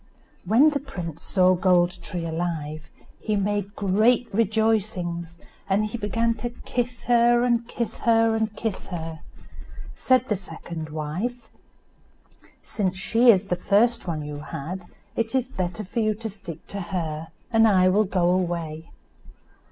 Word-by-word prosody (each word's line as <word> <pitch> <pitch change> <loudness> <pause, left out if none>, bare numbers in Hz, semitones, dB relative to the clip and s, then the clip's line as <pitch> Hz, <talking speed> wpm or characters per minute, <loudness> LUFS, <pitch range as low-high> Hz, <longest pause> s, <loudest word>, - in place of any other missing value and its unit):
When 245 - +5
the 285 - -1
prince 170 - -7
saw 185 -1 +3
Gold 180 -1 +2
tree 170 0 -5
alive 160 -2 -3 0.3
he 215 - -1
made 205 0 -1
great 215 +5 +3
rejoicings, 200 -6 0 0.3
and 200 +2 +2
he 215 +2 -4
began 230 +2 +1
to 240 +3 -3 0.2
kiss 245 -1 -2
her, 240 0 +4
and 235 -1 +1
kiss 235 -2 -4
her, 225 -1 +3
and 220 -1 -1
kiss 220 -3 -4
her. 165 -3 -5 0.8
Said 255 -1 +2
the 210 - +1
second 165 -3 -7
wife, 180 +11 -4 1.2
"Since 190 -3 -2
she 230 +5 +4
is 200 -2 +5
the 180 - +2
first 230 +4 +2
one 155 -3 -3
you 145 0 -6
had 155 +5 -6 0.3
it 230 +2 -1
is 260 -1 +1
better 185 -4 -3
for 200 - -3
you 215 -1 +1
to 225 +1 -5
stick 175 -5 -9
to 200 - -4
her, 165 -4 -3 0.3
and 225 0 +6
I 185 -3 +5
will 205 +4 +4
go 185 -2 +1
away." 170 -3 -1
200 Hz, 150 wpm, -25 LUFS, 175-225 Hz, 1.2 s, and